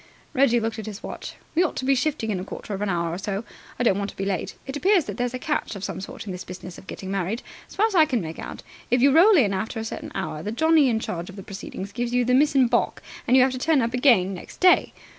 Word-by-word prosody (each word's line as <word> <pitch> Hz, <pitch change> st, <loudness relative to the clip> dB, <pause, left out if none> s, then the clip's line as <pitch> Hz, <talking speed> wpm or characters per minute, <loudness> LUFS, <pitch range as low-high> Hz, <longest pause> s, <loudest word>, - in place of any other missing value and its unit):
Reggie 255 Hz, -3 st, +4 dB
looked 225 Hz, 0 st, -3 dB
at 220 Hz, -, -6 dB
his 210 Hz, 0 st, -7 dB
watch. -, -, -7 dB, 0.2 s
"We 330 Hz, -, +3 dB
ought 360 Hz, -, +1 dB
to 260 Hz, -, -3 dB
be 275 Hz, -, +4 dB
shifting 265 Hz, -4 st, 0 dB
in 190 Hz, -, -1 dB
a -, -, -4 dB
quarter 205 Hz, -, -7 dB
of 195 Hz, -, -4 dB
an 210 Hz, -, 0 dB
hour 170 Hz, -2 st, -1 dB
or 175 Hz, -, -4 dB
so. 200 Hz, +1 st, -3 dB, 0.3 s
I 245 Hz, -, 0 dB
don't 200 Hz, -5 st, +3 dB
want 200 Hz, 0 st, -2 dB
to -, -, -12 dB
be 195 Hz, -, -2 dB
late. 190 Hz, -4 st, -2 dB
It 270 Hz, -, -5 dB
appears 370 Hz, +1 st, +3 dB
that -, -, -5 dB
there's 245 Hz, 0 st, -1 dB
a -, -, -1 dB
catch 295 Hz, -4 st, -2 dB
of 195 Hz, -, -7 dB
some 190 Hz, -, -4 dB
sort 220 Hz, +3 st, -8 dB
in 200 Hz, -, -5 dB
this 180 Hz, 0 st, -6 dB
business 180 Hz, -1 st, -9 dB
of 190 Hz, -, -17 dB
getting 190 Hz, 0 st, -6 dB
married. 195 Hz, +4 st, -2 dB, 0.3 s
As -, -, -13 dB
far 420 Hz, -, +3 dB
as 445 Hz, -, -1 dB
I 325 Hz, -4 st, +6 dB
can 260 Hz, -6 st, 0 dB
make 165 Hz, -4 st, -6 dB
out, -, -, -7 dB, 0.3 s
if 245 Hz, -, +3 dB
you 275 Hz, +3 st, +5 dB
roll 380 Hz, +4 st, +7 dB
in 210 Hz, -9 st, +3 dB
after 220 Hz, +4 st, -3 dB
a 220 Hz, -, -4 dB
certain -, -, -6 dB
hour, 190 Hz, -5 st, -3 dB
the 205 Hz, -, -4 dB
Johnnie 315 Hz, +3 st, +4 dB
in 225 Hz, -2 st, +1 dB
charge 175 Hz, -5 st, -5 dB
of 195 Hz, -, -10 dB
the 195 Hz, -, -8 dB
proceedings 195 Hz, 0 st, -7 dB
gives 240 Hz, +1 st, -2 dB
you 245 Hz, -1 st, +3 dB
the 250 Hz, -, +2 dB
miss 290 Hz, +3 st, +4 dB
in 265 Hz, -2 st, +6 dB
baulk, 240 Hz, 0 st, 0 dB, 0.2 s
and 255 Hz, -, +5 dB
you 255 Hz, -, +7 dB
have 260 Hz, -, +2 dB
to 255 Hz, -, -4 dB
turn 310 Hz, +2 st, +3 dB
up 235 Hz, +1 st, -2 dB
again 235 Hz, -8 st, +4 dB
next 180 Hz, -, -10 dB
day. 365 Hz, 0 st, +5 dB
230 Hz, 300 wpm, -24 LUFS, 195-270 Hz, 0.3 s, roll